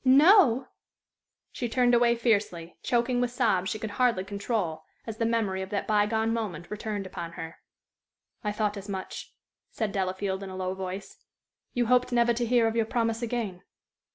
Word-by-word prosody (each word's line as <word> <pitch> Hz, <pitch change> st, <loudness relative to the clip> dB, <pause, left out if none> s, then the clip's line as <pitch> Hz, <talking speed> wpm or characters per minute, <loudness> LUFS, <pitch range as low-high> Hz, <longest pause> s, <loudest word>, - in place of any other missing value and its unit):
"Know!" 270 Hz, -, +6 dB, 0.8 s
She 240 Hz, -, -3 dB
turned 245 Hz, +1 st, +3 dB
away 235 Hz, 0 st, +5 dB
fiercely, 200 Hz, -8 st, 0 dB
choking 245 Hz, +1 st, +1 dB
with 245 Hz, -, +1 dB
sobs 215 Hz, -7 st, +1 dB
she 215 Hz, -, -2 dB
could 215 Hz, -1 st, -5 dB
hardly 235 Hz, -7 st, +3 dB
control, 200 Hz, -4 st, -2 dB, 0.2 s
as 225 Hz, -1 st, -6 dB
the 230 Hz, -, +1 dB
memory 210 Hz, -5 st, 0 dB
of 190 Hz, -, -5 dB
that 200 Hz, -, -2 dB
by 210 Hz, -1 st, +3 dB
gone 220 Hz, +1 st, 0 dB
moment 185 Hz, -7 st, -4 dB
returned 210 Hz, -1 st, -3 dB
upon 170 Hz, -2 st, -6 dB
her. 165 Hz, 0 st, -8 dB, 0.8 s
"I 210 Hz, -, 0 dB
thought 210 Hz, 0 st, -1 dB
as 200 Hz, +1 st, -8 dB
much," 190 Hz, -1 st, -6 dB, 0.3 s
said 220 Hz, -3 st, -2 dB
Delafield, 190 Hz, 0 st, -2 dB
in 195 Hz, -, -6 dB
a 185 Hz, -, -7 dB
low 185 Hz, 0 st, -2 dB
voice. 190 Hz, +1 st, -6 dB, 0.6 s
"You 245 Hz, -1 st, +2 dB
hoped 250 Hz, +2 st, +3 dB
never 235 Hz, 0 st, +3 dB
to 240 Hz, +1 st, -1 dB
hear 240 Hz, -1 st, +4 dB
of 225 Hz, 0 st, 0 dB
your 225 Hz, -1 st, +2 dB
promise 230 Hz, -1 st, 0 dB
again." 225 Hz, -6 st, -3 dB
220 Hz, 180 wpm, -28 LUFS, 190-235 Hz, 0.8 s, Know